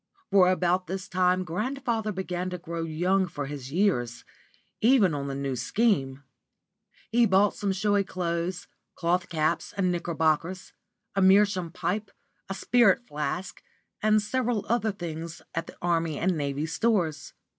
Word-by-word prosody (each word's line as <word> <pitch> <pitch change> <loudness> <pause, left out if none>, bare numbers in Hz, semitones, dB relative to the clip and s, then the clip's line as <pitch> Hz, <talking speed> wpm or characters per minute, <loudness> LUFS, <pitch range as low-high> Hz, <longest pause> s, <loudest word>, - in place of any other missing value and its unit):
For 185 -2 +6
about 180 -1 +1
this 190 +2 -4
time 185 0 +2
grandfather 225 +4 -2
began 185 -1 -3
to 180 - -4
grow 170 0 -5
young 180 +4 +1
for 145 -4 -5
his 135 -2 -7
years, 130 - 0 0.6
even 220 - +5
on 140 -1 -3
the 135 - -3
New 135 -1 -2
Scheme. 140 - 0 0.9
He 235 0 +4
bought 195 +1 +4
some 200 -1 -2
showy 205 +1 +1
clothes, 175 -1 -3 0.3
cloth 175 +1 0
caps, 155 -2 -1
and 185 -2 +2
knickerbockers, 170 +1 -1 0.4
a 195 - +2
meerschaum 190 -2 +4
pipe, 200 +4 -2 0.4
a 195 - -3
spirit 240 +1 +3
flask, 150 +4 -4 0.4
and 215 0 +4
several 235 -1 -1
other 225 -2 +1
things 170 -3 -7
at 165 0 -3
the - - -12
Army 165 -3 0
and 185 0 +1
Navy 145 0 -2
Stores. 165 -4 0
180 Hz, 145 wpm, -27 LUFS, 165-200 Hz, 0.9 s, For